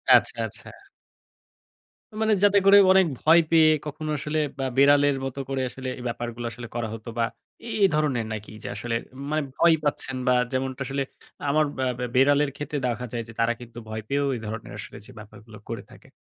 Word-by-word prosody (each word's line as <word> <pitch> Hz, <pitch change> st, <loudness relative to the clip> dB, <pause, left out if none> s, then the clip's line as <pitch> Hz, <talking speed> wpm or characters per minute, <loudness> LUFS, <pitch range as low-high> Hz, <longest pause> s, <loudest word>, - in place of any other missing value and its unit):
আচ্ছা, -, -, +3 dB
আচ্ছা। -, -, -7 dB, 1.5 s
মানে 220 Hz, -1 st, +3 dB
যাতে 205 Hz, 0 st, +5 dB
করে 200 Hz, +1 st, +8 dB
অনেক 190 Hz, -1 st, +5 dB
ভয় 165 Hz, +2 st, +6 dB
পেয়ে 160 Hz, -1 st, +6 dB, 0.2 s
কখনো 155 Hz, +1 st, -5 dB
আসলে 150 Hz, +2 st, -2 dB, 0.2 s
বা 135 Hz, -, -1 dB
বেড়ালের 145 Hz, 0 st, +5 dB
মতো 135 Hz, +1 st, -5 dB
করে 135 Hz, -1 st, -1 dB
আসলে 130 Hz, 0 st, -7 dB
এই 125 Hz, -, -8 dB
ব্যাপারগুলো 120 Hz, 0 st, -4 dB
আসলে 120 Hz, 0 st, -8 dB
করা 120 Hz, -2 st, -1 dB
হতো। 110 Hz, 0 st, -9 dB
বা -, -, +3 dB, 0.4 s
এই 215 Hz, -3 st, +3 dB
ধরনের 145 Hz, -7 st, +1 dB
নাকি 110 Hz, 0 st, -7 dB
যে, -, -, -5 dB
আসলে 120 Hz, -1 st, -3 dB, 0.4 s
মানে 155 Hz, 0 st, +1 dB
ভয় 170 Hz, -1 st, +5 dB
পাচ্ছেন 135 Hz, -2 st, -1 dB
বা 125 Hz, -, +5 dB, 0.2 s
যেমনটা 130 Hz, 0 st, -2 dB
আসলে 135 Hz, +1 st, -1 dB, 0.5 s
আমার 155 Hz, +2 st, +3 dB
বা 130 Hz, -, -1 dB, 0.2 s
ব্যা 125 Hz, -, -2 dB
বেড়ালের 145 Hz, +2 st, +4 dB
ক্ষেত্রে 145 Hz, 0 st, -4 dB
দেখা 125 Hz, 0 st, -2 dB
যায় 120 Hz, -1 st, -2 dB
যে, 115 Hz, -, -11 dB
তারা 115 Hz, +1 st, +3 dB
কিন্তু 120 Hz, -1 st, -12 dB
ভয় 110 Hz, 0 st, -4 dB
পেয়েও 140 Hz, +2 st, 0 dB
এ -, -, -5 dB
ধরনের 110 Hz, +1 st, -6 dB
আসলে -, -, -8 dB
যে, -, -, -12 dB
ব্যাপারগুলো 105 Hz, +1 st, -13 dB
করে 115 Hz, -, -4 dB
থাকে। -, -, -16 dB
135 Hz, 190 wpm, -25 LUFS, 120-150 Hz, 1.5 s, করে